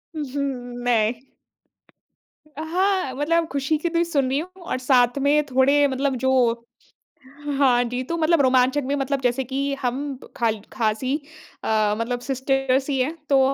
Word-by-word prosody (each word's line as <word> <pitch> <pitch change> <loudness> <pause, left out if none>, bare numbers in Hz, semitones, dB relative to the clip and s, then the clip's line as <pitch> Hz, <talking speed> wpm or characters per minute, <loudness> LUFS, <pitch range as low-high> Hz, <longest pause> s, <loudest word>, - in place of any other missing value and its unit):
उ 305 - -2
हुँ, 285 -1 -1 0.4
मैं 235 +1 0 1.1
अ, 305 0 -9
हाँ, 365 -2 0
मतलब 330 +4 +1
खुशी 280 +2 0
के 340 +3 -2
द 335 0 +1
सुन 285 -6 0
रही 270 +2 +1
हूँ, 365 +3 -9
और 340 - -2
साथ 250 -1 +3
में 290 +2 +3
थोड़े 280 +2 +3
मतलब 270 0 -1
जो 260 - +3 1.3
हाँ 250 -3 +4
जी, 245 +1 -3
तो 335 +6 -3
मतलब 325 -1 +3
रोमांचक 260 +1 +3
में 280 +2 0
मतलब 275 0 -1
जैसे 250 +1 +1
कि 275 +2 -2
हम 270 +2 -2 0.2
खाल 225 -2 0
ख़ास 220 +1 -1
ही 260 +2 0 0.5
अ, 215 -1 +1
मतलब 240 +2 -2
सिस्टर्स 270 +1 0
ही 275 - 0
हैं। 280 +6 0
तो 275 -1 +5
270 Hz, 165 wpm, -23 LUFS, 250-290 Hz, 1.3 s, तो